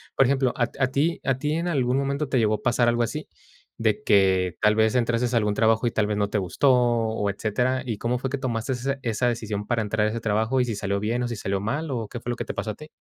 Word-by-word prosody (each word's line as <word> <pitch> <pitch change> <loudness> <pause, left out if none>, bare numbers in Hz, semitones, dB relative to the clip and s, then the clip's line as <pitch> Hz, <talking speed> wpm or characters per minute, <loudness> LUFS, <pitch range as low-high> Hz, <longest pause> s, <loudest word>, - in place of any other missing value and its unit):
Por 135 - +5
ejemplo, 135 -2 +1
a 120 -1 +1
t 135 - -11
a - - +4
ti 155 +5 +1
a 135 -2 +1
ti 150 +2 -1
en 170 +2 -1
algún 130 -5 +1
momento 140 +1 -1
te 130 - +1
llegó 110 -2 +2
a - - -8
pasar 120 -2 +2
algo 120 0 +2
así, - - -4 0.5
de 110 -2 +1
que 95 -3 +3
tal 105 0 +4
vez 110 +1 +3
entraste 120 0 +1
a - - +5
algún 105 -1 0
trabajo, 115 +1 +3
y - - 0
tal 105 -2 +1
vez 105 0 -1
no 100 -1 0
te 105 - -1
gustó, 100 +8 +2
o 115 -4 +1
etcétera. 125 +6 -1
¿Y 115 -5 -3
cómo 120 +3 -1
fue 130 - -3
que 140 - -2
tomaste 125 -1 -2
esa 135 +2 -2
esa 120 0 0
decisión 110 -3 -2
para 115 0 0
entrar 105 0 0
a - - +2
ese 115 - -3
trabajo 110 +4 +1
y - - +1
si 115 - -3
salió 100 0 -2
bien, 115 +4 -1
o - - -1
si 120 - -4
salió 100 -2 -2
mal, 140 +10 -2
o 115 -5 -3
qué 120 - -7
fue 120 - -7
lo 120 - -1
que 120 -1 -5
te - - -5
pasó 105 +2 -3
a - - -8
ti? 155 0 -12
120 Hz, 290 wpm, -25 LUFS, 105-130 Hz, 0.5 s, Por